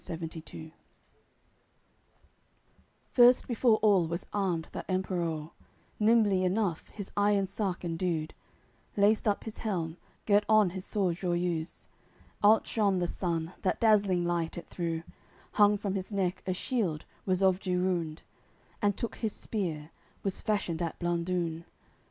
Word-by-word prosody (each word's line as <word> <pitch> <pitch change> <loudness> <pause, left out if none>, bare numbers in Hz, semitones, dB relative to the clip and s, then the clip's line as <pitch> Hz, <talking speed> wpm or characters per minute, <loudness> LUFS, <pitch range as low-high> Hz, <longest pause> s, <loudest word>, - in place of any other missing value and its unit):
AOI. 165 - -5 0.2
CCXC 160 0 -10 2.4
First 245 0 +6
before 235 -2 +3
all 195 -6 +5
was 170 +2 -4
armed 180 -5 0
that - - -6
Emperour, 170 -4 -2 0.5
Nimbly 210 -4 +4
enough 185 -2 0
his 200 -2 -8
iron 205 -1 +3
sark 190 -2 -3
indued, 165 -2 -2 0.6
Laced 210 +2 +3
up 205 - +1
his 220 0 -8
helm, 175 -6 -2 0.3
girt 205 0 +4
on 215 -4 +5
his 190 +1 -6
sword 185 -5 0
Joiuse, 175 -2 -2 0.6
Outshone 210 -1 +4
the 180 - +1
sun 170 -1 -2
that 185 - 0
dazzling 200 -5 +3
light 170 -1 -1
it 170 - -8
threw, 165 -2 -3 0.5
Hung 205 -1 +5
from 200 -1 -3
his 195 +1 -4
neck 190 -2 -1
a 185 - +1
shield, 185 -9 -1 0.2
was 185 0 +2
of 190 -1 +4
Girunde, 180 -4 -1 0.6
And 205 -2 +2
took 235 - -4
his 220 -3 -2
spear, 165 -7 -4 0.3
was 195 -2 -2
fashioned 190 -6 -1
at 165 -1 -2
Blandune. 170 -1 -1
185 Hz, 135 wpm, -30 LUFS, 170-205 Hz, 2.4 s, First